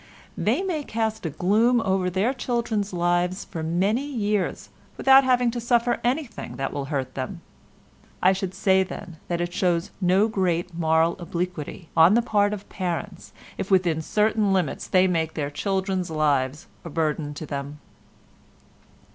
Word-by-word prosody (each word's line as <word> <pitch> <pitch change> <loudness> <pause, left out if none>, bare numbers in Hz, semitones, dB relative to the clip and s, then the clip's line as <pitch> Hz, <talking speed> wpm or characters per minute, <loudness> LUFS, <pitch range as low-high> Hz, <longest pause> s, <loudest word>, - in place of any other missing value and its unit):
They 250 - 0
may 335 -6 -2
cast 220 -6 -2
a - - -2
gloom 215 - +3
over 190 -3 0
their 195 +8 +1
children's 235 -5 -2
lives 175 +1 0
for 165 - -6
many 190 - +1
years 210 -8 -2 0.3
without 270 0 +7
having 250 -2 +3
to 240 0 -4
suffer 240 0 +2
anything 245 -3 -2
that 135 - -3
will 140 - -3
hurt 135 -3 -3
them. 130 -2 -5 0.8
I 185 +1 +4
should 190 -1 -4
say, 190 -1 +3
then, 180 -2 -6
that 175 -1 -1
it 175 0 -3
shows 175 -3 0
no 190 +4 +4
great 180 -4 -1
moral 160 0 +2
obliquity 175 -1 -5
on 165 +6 +6
the 235 - +3
part 205 -3 +2
of 205 -1 -6
parents 180 0 -4 0.3
if 190 - -3
within 175 -5 +2
certain 210 +3 +1
limits 180 -7 -1
they 185 0 +4
make 165 -3 0
their 145 -2 -2
children's 190 +1 -1
lives 145 -3 0 0.2
a 170 - -7
burden 150 -2 -1
to 155 - -6
them. 140 0 -6
185 Hz, 155 wpm, -24 LUFS, 165-215 Hz, 0.8 s, without